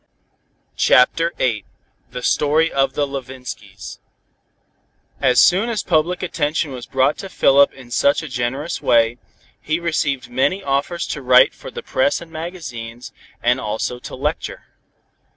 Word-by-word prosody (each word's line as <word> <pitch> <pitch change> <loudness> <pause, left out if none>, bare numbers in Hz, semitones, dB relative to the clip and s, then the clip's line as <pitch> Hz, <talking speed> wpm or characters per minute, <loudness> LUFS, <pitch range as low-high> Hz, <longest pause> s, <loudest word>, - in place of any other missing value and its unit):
CHAPTER 165 +7 +4
VIII 115 -5 0 0.5
THE 125 - -7
STORY 155 +5 +2
OF 135 0 +1
THE 145 - 0
LEVINSKYS 130 -2 -8 1.2
As 125 -2 +4
soon 195 +6 +4
as 220 -4 -2
public 175 +3 +1
attention 155 -3 -1
was 125 -2 -8
brought 135 +2 +1
to 195 - -7
Philip 140 -3 +4
in 125 -2 -14
such 140 +5 +2
a - - -6
generous 130 +4 -3
way, 115 +1 +3 0.4
he 155 +2 -1
received 145 -7 -1
many 185 +10 0
offers 140 +5 -1
to 150 - -4
write 125 0 +5
for - - -10
the - - -8
press 130 +2 +1
and 170 -1 -12
magazines, 135 -9 -7 0.3
and 125 +2 +3
also 110 +3 -3
to - - -8
lecture. 150 +4 -3
140 Hz, 140 wpm, -20 LUFS, 125-160 Hz, 1.2 s, write